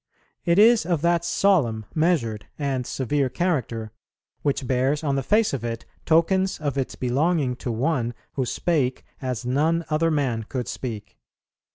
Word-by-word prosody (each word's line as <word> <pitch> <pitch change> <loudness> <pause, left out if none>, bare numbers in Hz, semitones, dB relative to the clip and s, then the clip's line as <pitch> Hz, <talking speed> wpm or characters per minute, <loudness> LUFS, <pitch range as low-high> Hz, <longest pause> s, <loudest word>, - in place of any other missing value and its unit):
It 170 0 +3
is 225 +2 +6
of 170 -3 -1
that 170 0 +3
solemn, 160 - +2
measured, 145 -11 0
and 135 -4 -2
severe 135 +1 0
character, 125 - -1 0.5
which 140 -2 0
bears 130 +4 +1
on 140 -2 +1
the 135 - +1
face 210 - +2
of 130 -4 -3
it 115 -1 -4 0.2
tokens 185 +4 +3
of 145 -3 -2
its 135 -2 -2
belonging 135 +1 +1
to 125 - -4
One 120 0 0 0.2
who 130 -3 -1
spake 135 -3 0 0.2
as 125 -2 -3
none 160 +6 +1
other 160 +2 +2
man 135 -7 0
could 125 -3 -3
speak. 110 -5 -6
140 Hz, 155 wpm, -24 LUFS, 125-165 Hz, 0.5 s, is